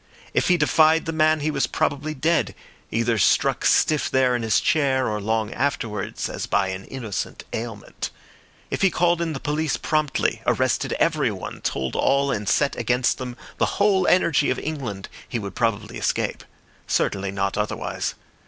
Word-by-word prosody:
If - - +2
he 180 - +4
defied 155 +2 +4
the 165 - -3
man 155 -1 +3
he 155 +2 0
was - - 0
probably 150 +2 -1
dead, 160 +5 +1 0.3
either 115 0 +1
struck - - +3
stiff 155 -2 +3
there 130 -1 +3
in 120 - -1
his 110 -2 +2
chair 135 -4 +2
or 105 -1 -2
long 110 +1 -1
afterwards 115 -6 -2
as - - -5
by 95 - +1
an 95 0 -5
innocent 115 -7 -5
ailment. 110 -3 -5 0.6
If - - -2
he 195 - +5
called 175 -1 +2
in 165 -2 -1
the 135 - -4
police 150 +1 -1
promptly, 155 -3 0
arrested - - +1
everyone, - - -1
told 65 -1 -2
all, 140 0 +2
and 105 -5 -2
set 140 - +2
against 125 +1 +1
them 125 -1 -6 0.2
the - - 0
whole 200 -2 +3
energy 170 -5 +3
of 130 - 0
England, 125 -12 -4 0.2
he - - -2
would 100 -4 -5
probably 110 -2 -1
escape; - - -1 0.4
certainly 100 0 0
not 100 0 -1
otherwise. 105 0 -2
130 Hz, 165 wpm, -23 LUFS, 110-155 Hz, 0.6 s, he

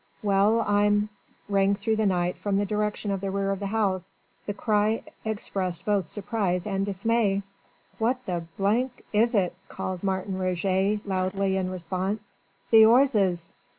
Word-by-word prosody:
Well! 205 +3 +3
I'm 205 0 +2 0.2
..." - - -35
rang 200 0 +3
through 220 +2 -1
the 215 -1 +2
night 180 -1 +1
from 200 -1 -1
the 205 - +1
direction 210 0 -1
of 195 -1 -2
the 195 - -2
rear 195 0 -1
of 195 - -2
the 200 - -3
house. 195 -3 -1 0.3
The 205 - -1
cry 215 +1 +1 0.2
expressed 195 -5 -3
both 200 -5 +1
surprise 200 -3 -2
and 195 -2 -1
dismay. 200 0 +1 0.6
"What 250 +3 0
the 175 -2 -3 0.7
is 230 +3 +3
it?" 185 -4 +2 0.2
called 185 -1 -5
Martin 190 0 -2
Roget 190 +3 0
loudly 190 0 0
in 185 -1 -1
response. 185 +4 -4 0.4
"The 220 -1 +9
'orzes!" 220 -8 +3
200 Hz, 150 wpm, -26 LUFS, 185-210 Hz, 0.7 s, The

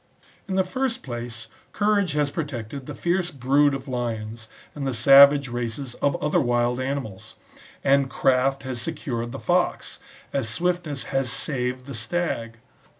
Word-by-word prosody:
In 190 - -2
the 190 - +3
first 255 +6 -2
place, 120 -2 -6 0.3
courage 205 -5 +2
has 145 -1 +1
protected 135 -4 -5
the - - -6
fierce 175 +1 0
brood 140 0 +2
of 135 +1 -7
lions, 115 -3 -4 0.3
and 140 -2 -4
the 130 - -1
savage 140 +3 +7
races 120 +2 -4
of 140 - +2
other 150 - +2
wild 120 0 +1
animals; 130 -7 -4 0.5
and 140 0 +3
craft 135 +1 +2
has 130 -3 -4
secured 120 -5 -3
the 135 - -6
fox, 175 +5 0 0.3
as 135 -5 0
swiftness 170 +1 -1
has 135 -2 +1
saved 130 -2 -1
the 140 - -7
stag. 115 -2 -3
135 Hz, 150 wpm, -24 LUFS, 120-150 Hz, 0.5 s, savage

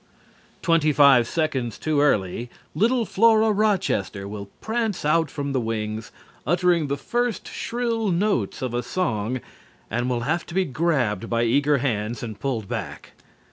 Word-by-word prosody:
Twenty 165 -3 +3
five 140 -5 +6
seconds 135 -8 -1
too 155 -2 0
early 115 -3 +1 0.2
little 235 +3 +2
Flora 220 +1 +4
Rochester 190 - 0
will 100 -1 -7
prance 220 -6 -2
out 160 0 +2
from 140 0 -4
the 130 - +1
wings, 110 -1 -3 0.3
uttering 175 +1 +2
the 140 +1 -1
first 240 - -2
shrill 230 -3 -2
notes 175 - 0
of 125 -2 -2
a 120 - 0
song, 120 - -2 0.5
and 120 +3 -1
will 120 -2 -1
have 160 +8 0
to 170 - -8
be 190 0 +2
grabbed 130 - 0
by 115 0 +1
eager 140 +5 +3
hands 115 -3 -2
and 110 -3 -6
pulled 120 -7 -2
back. 100 -12 -6
140 Hz, 150 wpm, -24 LUFS, 115-180 Hz, 0.5 s, five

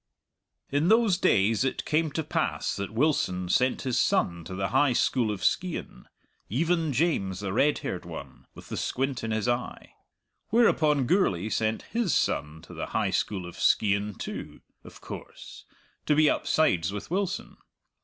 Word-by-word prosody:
In 145 +4 +2
those 220 -3 +4
days 105 +4 +3
it 130 - -2
came 160 +1 +1
to 160 - -1
pass - - -1
that 100 - -4
Wilson 110 - 0
sent 125 +7 +2
his 125 -3 0
son 85 -6 +1
to 95 - -6
the 95 +1 -2
High 145 -3 +3
School 120 -1 +1
of 100 -3 -4
Skeighan 180 -2 -2 0.4
even 165 - +1
James, 120 - 0
the 95 -2 -3
red 145 +7 +3
haired - - -3
one, - - -10
with - - -13
the - - -4
squint 135 -1 -2
in 115 - -2
his 110 0 -1
eye. 120 0 -3 0.6
Whereupon 155 - +3
Gourlay 110 - +1
sent 110 +1 -1
his 230 -8 -1
son 75 +2 -1
to - - -12
the - - -5
High - - 0
School 95 -4 -1
of 85 - -10
Skeighan 100 -1 +2
too, - - -7 0.2
of - - -14
course, - - -10 0.4
to 150 - +4
be 155 0 +5
upsides 95 - +1
with 105 +9 -7
Wilson. 195 +1 -2
125 Hz, 165 wpm, -27 LUFS, 100-160 Hz, 0.6 s, be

